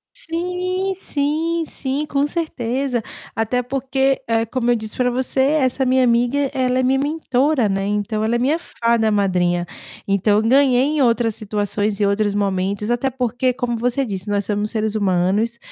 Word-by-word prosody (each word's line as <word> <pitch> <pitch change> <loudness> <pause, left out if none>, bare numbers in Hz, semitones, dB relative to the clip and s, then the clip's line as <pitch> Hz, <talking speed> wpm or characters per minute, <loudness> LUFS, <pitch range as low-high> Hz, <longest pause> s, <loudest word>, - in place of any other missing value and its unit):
Sim, 360 +3 -2
sim, 325 0 -1
sim, 275 +2 -3
com 285 0 +1
certeza. 265 -6 -2 0.3
Até 235 +3 0
porque, 270 +1 0
ah, 225 0 +2
como 245 +1 -1
eu - - +4
disse 220 -1 -4
para 250 -1 +1
você, 260 +1 -1
essa 265 -2 +2
minha 255 0 +3
amiga, 245 +4 +2
ela 255 -1 +1
é - - +2
minha 265 +1 +2
mentora, 285 -3 +1
né, 195 0 -1
então 210 +1 -1
ela 230 +2 +1
é - - 0
minha 285 +7 +1
fada 230 -7 0
madrinha. 180 -4 +1 0.4
Então 200 +1 +2
eu 215 - +3
ganhei 255 +1 +4
em 295 0 +1
outras 230 -2 +2
situações 205 0 -2
e 205 - +2
outros 205 0 +1
momentos. 200 +2 -1
Até 245 +3 +1
porque, 250 0 -1
como 240 -2 -2
você 250 +3 0
disse, 200 -2 -5
nós 205 -1 0
somos 210 +1 -1
seres 220 -1 -1
humanos; 200 +4 +1
240 Hz, 170 wpm, -20 LUFS, 210-270 Hz, 0.4 s, eu